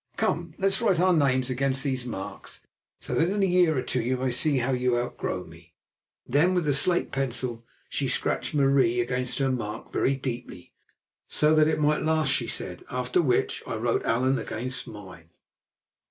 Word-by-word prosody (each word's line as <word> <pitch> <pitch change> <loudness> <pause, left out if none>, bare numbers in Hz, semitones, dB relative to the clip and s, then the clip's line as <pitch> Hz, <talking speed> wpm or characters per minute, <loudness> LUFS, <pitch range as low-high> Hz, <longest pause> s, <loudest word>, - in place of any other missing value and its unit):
Come, 170 -1 -1
let 195 0 +2
us 195 - -1
write 195 -7 +2
our 185 +1 +4
names 130 -5 +2
against 135 +1 0
these 130 -3 -1
marks, 95 -5 -7 0.3
so - - -6
that 165 +2 +2
in 200 0 0
a - - +5
year 175 -4 +3
or 130 - 0
two 125 - -1
you 125 +3 -1
may 130 0 -1
see 140 +3 +1
how 130 +1 0
you 125 -1 +1
outgrow 120 0 -3
me." - - -16 0.5
Then 165 +8 +2
with 175 -3 +1
the 145 - +2
slate 175 +6 +2
pencil 125 -3 -2 0.2
she - - -2
scratched - - -1
"Marie" 135 -4 +3
against 125 +1 -1
her 135 -1 +1
mark 110 -3 -5
very 135 - +2
deeply, 120 -9 -6 0.5
so 150 +1 +3
that 155 -1 +5
it 160 - 0
might 150 0 +2
last, 155 -1 +1
she - - 0
said; - - -5
after 125 +6 0
which 130 -7 0
I - - -3
wrote 115 +1 0
"Allan" 130 +3 +1
against 125 +3 -4
mine. 95 -6 -11
130 Hz, 185 wpm, -26 LUFS, 125-155 Hz, 0.5 s, a